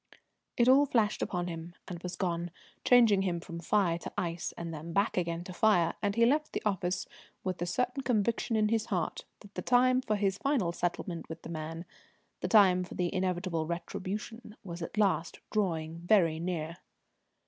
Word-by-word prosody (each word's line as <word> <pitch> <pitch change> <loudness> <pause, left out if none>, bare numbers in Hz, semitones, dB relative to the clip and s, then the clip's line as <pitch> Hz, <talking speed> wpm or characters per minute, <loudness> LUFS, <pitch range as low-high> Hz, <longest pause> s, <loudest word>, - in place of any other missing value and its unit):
It 240 - +4
all 275 +3 +6
flashed 220 -5 +1
upon 175 -1 -1
him 170 0 -6
and 175 -2 -6
was 180 0 -5
gone, 175 -2 -1 0.3
changing 230 -6 +6
him 180 -3 -1
from 170 0 -8
fire 175 -1 +1
to - - -7
ice, 170 -1 -2
and 170 -1 -5
then 160 +2 -7
back 200 +4 +2
again 170 -1 -1
to 185 - -8
fire; 180 -4 +3
and 205 -1 0
he 230 0 +5
left 300 +5 +1
the - - -2
office 185 -3 0 0.4
with 185 -1 -2
the 175 - -2
certain 250 +9 -1
conviction 235 -1 0
in 215 -1 +3
his 225 0 0
heart 180 -8 -2 0.2
that 205 -1 -15
the - - -4
time 255 +1 +4
for 215 -4 0
his 200 -1 0
final 270 -11 +1
settlement 175 0 -3
with 160 0 -8
the - - -8
man, 165 +1 -5 0.5
the - - -2
time 190 -5 +6
for 180 - -9
the 175 -1 -1
inevitable 180 -3 -1
retribution, 205 +6 -5
was 175 -3 -7
at 165 - -6
last 195 -5 +1
drawing 165 -6 -1
very 170 -3 +3
near. 165 -1 -3
185 Hz, 185 wpm, -31 LUFS, 170-215 Hz, 0.5 s, all